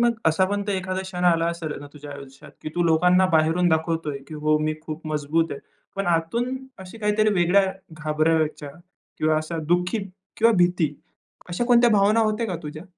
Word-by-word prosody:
मग 235 0 +3
असा 160 +4 +2
पण 205 0 -1
एखादा 185 0 -2
क्षण 180 -1 -4
आला 165 -1 +3
असेल 160 -3 -5
ना, 145 - -9
तुझ्या 145 -1 -11
आयुष्यात 140 -1 -12
की - - -4
तू 175 - +1
लोकांना 180 +3 +4
बाहेरून 160 +3 +3
दाखवतोय, 160 -3 -1
की 155 - -8
हो 155 0 +4
मी 155 0 -1
खूप 160 0 -7
मजबूत 155 +2 0
आहे. 140 - -7 0.4
पण 195 - -2
आतून 175 +10 0 0.3
अशी 190 +5 -11
काहीतरी 215 0 +2
वेगळ्या 190 +2 +3 0.2
घाबरायच्या 155 -1 0 0.5
किंवा 155 0 +2
अशा 155 +2 -3
दुःखी 180 +5 +1 0.4
किंवा 230 +1 +4
भीती 175 -4 +2 0.5
अशा 175 +7 -2
कोणत्या 240 -1 +5
भावना 210 +1 +4
होत्या 220 +1 0
का 185 - -3
तुझ्या? 155 +1 -7
170 Hz, 175 wpm, -23 LUFS, 155-195 Hz, 0.5 s, कोणत्या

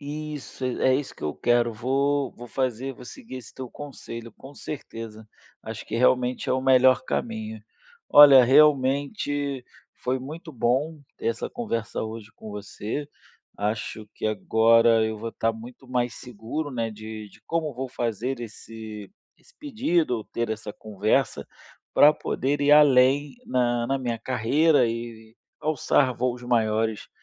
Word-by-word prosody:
Isso, 150 -2 -7
é 130 +1 +2
isso 140 0 -3
que - - -15
eu 75 - -2
quero. 120 -1 +2
Vou 135 +4 0
vou 120 - -11
fazer, 130 +1 -2
vou 125 - -13
seguir 225 - -10
esse 120 -4 -11
teu 130 -2 -7
conselho, 115 -5 -9
com 140 +2 -14
certeza, 115 -7 -8 0.4
acho - - -7
que - - -3
realmente 125 0 +2
é - - +3
o 130 - +1
melhor 130 -1 +5
caminho. 110 -1 -3 0.5
Olha, 140 -3 +9
realmente 140 - +2 0.3
foi 130 +1 -2
muito 155 +4 -8
bom 135 +6 0 0.2
ter - - -6
essa 115 - -2
conversa 115 - -3
hoje 110 -1 -7
com 110 - -10
você. 105 +7 -5 0.5
Acho 105 +1 -3
que - - -3
agora 115 +1 +4
eu 110 0 -2
vou 115 +2 -5
estar 115 - 0
muito 120 +3 -12
mais 125 -1 -1
seguro, 125 +5 -5
né, 115 -3 -2
de 110 0 -8
de - - -20
como 160 -3 -1
vou 130 +1 -4
fazer 120 +2 -3
esse 110 - -9 0.3
esse 485 - -25
pedido 195 - 0
ou 110 - -6
ter 115 -1 -3
essa 110 -1 -5
conversa 110 +4 -1 0.5
pra 150 +1 +7
poder 145 -1 -2
ir 145 +1 +3
além 145 - +5
na 120 -1 +1
na 135 +1 0
minha 120 -3 -3
carreira 130 +4 +2
e 115 -1 -6 0.2
alçar 140 -3 +1
voos 125 0 -2
maiores. 110 -2 0
125 Hz, 150 wpm, -25 LUFS, 115-140 Hz, 0.5 s, Olha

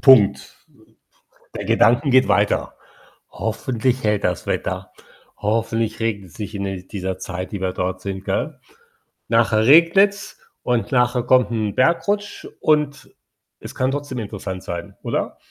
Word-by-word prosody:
Punkt. 125 -8 +4 0.7
Äh, - - -14
der - - -4
Gedanken 120 +5 +3
geht 130 -5 +5
weiter. 100 +1 +1 0.6
„Hoffentlich 125 +2 -2
hält 105 -1 +1
das 90 -2 -1
Wetter. 95 0 -3 0.4
Hoffentlich 115 +1 -1
regnet's 100 -6 -3
nicht 105 0 -6
in, 100 -1 -3
äh, 95 -1 -5
dieser 95 -2 -4
Zeit, 90 +2 -6
die 100 - -4
wir 95 -1 -1
dort 90 0 -3
sind,“ 95 0 -5
gell? - - -2 0.7
Nachher 115 -1 +3
regnet's, 195 - +4 0.2
und 125 +2 0
nachher 125 -1 +2
kommt 125 -3 +3
'n 110 -3 -2
Bergrutsch, 200 +8 0
und 150 -2 0 0.5
es - - -10
kann 130 +1 +1
trotzdem 145 -3 -4
interessant 95 -3 -6
sein, 85 0 -6
oder? - - -2
110 Hz, 140 wpm, -21 LUFS, 100-130 Hz, 0.7 s, geht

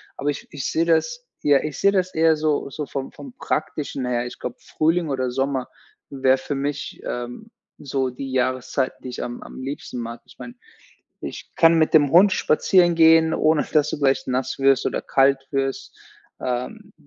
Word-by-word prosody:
aber 145 - -2
ich 145 - -4
ich 140 -3 -4
sehe 165 - +1
das 485 - 0 0.2
ja, 145 -2 +4
ich 155 -1 -5
sehe 200 - +4
das 185 -2 0
eher 160 0 +4
so 150 -2 -1
so 150 +2 -5
vom 135 -1 -5
vom 270 -3 -11
Praktischen 150 - -3
her. 120 -1 -1
Ich - - -10
glaube, 120 - -6
Frühling 165 +1 0
oder 130 -2 -1
Sommer 135 0 -1 0.4
wäre 135 -1 +2
für 135 +2 -5
mich, 145 +1 -4
ähm, 120 - -6 0.3
so 135 -2 -2
die 130 +2 -7
Jahreszeit, 130 +1 0
die 130 - -6
ich 125 - -5
am 120 0 -6
am - - -10
liebsten 135 -1 -6
mag. 115 0 -6
Ich - - -19
meine, 240 - -9 0.7
ich - - -8
kann 165 0 +6
mit 160 -1 +2
dem 145 -3 +5
Hund 190 +4 +7
spazieren 175 +2 +3
gehen, 160 0 +5
ohne 155 -1 +2
dass 150 -1 +3
du - - -4
gleich 135 -2 +1
nass 130 0 -2
wirst 135 -1 +3
oder - - -2
kalt 135 0 +2
wirst. 135 - -3 0.4
Ähm. 165 - -4
140 Hz, 185 wpm, -22 LUFS, 130-160 Hz, 0.7 s, Hund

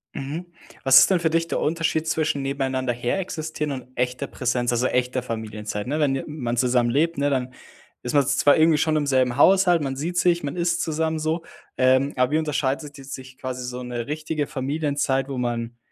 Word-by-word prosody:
Mhm. 145 +6 -5 0.4
Was 135 -1 +8
ist - - +5
denn 185 - +3
für 160 -1 0
dich 165 0 +1
der - - -1
Unterschied 160 0 0
zwischen 155 -3 0
nebeneinander 130 -2 -1
her 120 +9 -1
existieren 155 -4 -4
und 130 -2 -6
echter 125 0 -1
Präsenz, 120 -1 -1
also, 120 +1 +1
echter 125 0 0
Familienzeit, 110 -2 -5
ne, 150 +3 -1
wenn 145 -3 +2
je 135 - -3
man 125 -6 -3
zusammen 120 -1 +2
lebt, 165 +4 +1
ne, 145 0 +1
dann 130 -1 -1 0.5
ist 125 - -3
man 145 -2 +4
z - - +1
zwar 145 - +5
irgendwie 160 -1 +5
schon 155 0 +1
im 150 -2 0
selben 130 -2 +2
Haushalt, 180 -1 +5
man 135 -2 -2
sieht 170 +6 -3
sich, 175 -2 +2
man 140 +4 -3
isst 170 0 0
zusammen 160 0 -1
so, 160 +2 -1 0.3
ähm, 130 +2 +3
aber 125 +1 +2
wie 155 - +3
unterscheidet 150 -1 -2
die 135 - -11
sich 130 -1 -9
quasi 125 -1 -5
so 125 0 -5
ne 120 -1 -4
richtige 155 +1 -3
Familienzeit, 140 -1 -1
wo 135 - -4
man 120 -1 -3
140 Hz, 205 wpm, -23 LUFS, 125-155 Hz, 0.5 s, Was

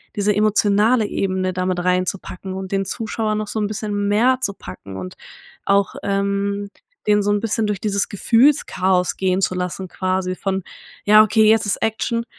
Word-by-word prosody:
diese 205 -1 +1
emotionale 215 +2 +3
Ebene 185 -2 -1
da 185 0 -2
mit 185 -1 -1
reinzupacken 185 +1 -2
und 190 0 -6
den 195 0 0
Zuschauer 220 +1 -2
noch 215 0 -3
so 220 - -3
'n 210 - 0
bisschen 205 -1 -3
mehr 235 +6 +3
zu 205 -6 0
packen 95 - -10
und 90 -1 -7 0.5
auch, 200 0 +2
ähm, 200 0 -1 0.4
den 210 0 +3
so 205 - -1
'n 205 - +2
bisschen 225 -1 0
durch 205 -2 -2
dieses 200 -1 0
Gefühlschaos 195 -6 +2
gehen 190 0 0
zu 185 - +1
lassen, 180 +1 -4
quasi 185 +1 -2
von 190 0 -2 0.4
„Ja, 215 +1 +8
okay, 220 0 +3
jetzt 220 0 +4
ist 200 - +1
Action. 230 +1 -1
200 Hz, 175 wpm, -20 LUFS, 185-215 Hz, 0.5 s, Ja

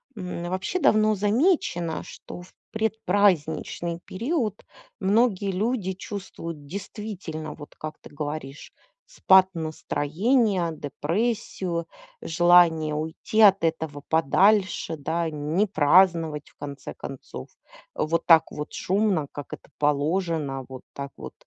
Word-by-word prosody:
М, 180 -3 -5
вообще 190 - -2
давно 215 -5 +4
замечено, 205 - +1
что 175 - -10
в 180 - -16 0.2
предпраздничный 190 -6 0
период 230 - -2 0.4
многие 200 -1 +2
люди 205 0 -1
чувствуют 175 -6 -7
действительно, 185 -4 -6
вот 145 -1 -12
как 155 0 -7
ты - - -13
говоришь, 145 -1 -6 0.3
спад 190 - +5
настроения, 170 - 0
депрессию, 170 - -2 0.4
желание 165 -2 +4
уйти 160 +8 -1
от 195 -4 +7
этого 160 -3 -2
подальше, 185 +2 +3
да, 165 +3 -1
не 155 +6 0
праздновать 165 -2 +3
в - - -29
конце 140 -1 -7
концов, - - -9 0.5
вот 165 +2 0
так 165 -2 +6
вот 150 +1 -6
шумно, 190 -6 0
как 145 -2 -8
это - - -10
положено, 150 -1 0
вот 130 -1 -9
так 140 0 -6
вот - - -8
175 Hz, 110 wpm, -25 LUFS, 155-200 Hz, 0.5 s, от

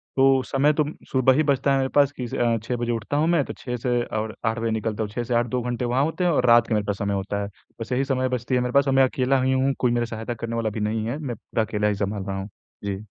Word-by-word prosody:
तो 135 0 +5
समय 140 +4 +2
तो 150 - +2 0.3
सुबह 130 0 +4
ही 155 +4 +3
बचता 140 -1 +2
है 135 - +3
मेरे 135 0 0
पास 145 -1 +5
कि 125 - -2
स - - -11
अ, 115 -1 +2
6 125 +2 -2
बजे 120 0 -2
उठता 115 +5 -2
हूँ 155 +2 +2
मैं 170 -4 +3
तो - - -6
6 125 -1 -5
से 120 0 0
और 110 -1 -4
8 115 0 0
बजे 115 0 -1
निकलता 110 0 -2
हूँ, 105 - -4
6 120 +3 -3
से 120 - -3
8 120 +1 +3
2 125 +2 -1
घंटे 125 0 -2
वहाँ 125 +3 +1
होते 160 +4 -1
हैं 175 - +3
और 130 -5 +2
रात 120 -1 +6
के - - -1
मेरे 105 -1 +1
पास 100 -1 -2
समय 100 0 -1
होता 100 +1 -2
है। 100 - -5 0.3
बस 115 - -6
यही 130 +2 +1
समय 130 -1 0
बचती 125 0 -1
है 125 - +2
मेरे 125 0 -1
पास 140 0 +4
और 135 - +2
मैं 135 0 +6
अकेला 130 +1 +1
ही 130 +1 +2
हूँ 135 +1 +2
कोई 125 - +2
मेरा 120 0 +1
सहायता 115 +1 -5
करने 115 0 -5
वाला 115 -1 0
भी 110 - -5
नहीं 110 +1 -1
है, 120 +5 -2
मैं 140 -6 -4
पूरा 110 - -2
अकेला 105 -1 -1
ही 105 - +1
सँभाल 100 0 -2
रहा 95 0 -4
हूँ। 95 +2 -5 0.3
जी। 100 +1 -4
120 Hz, 315 wpm, -24 LUFS, 110-130 Hz, 0.3 s, रात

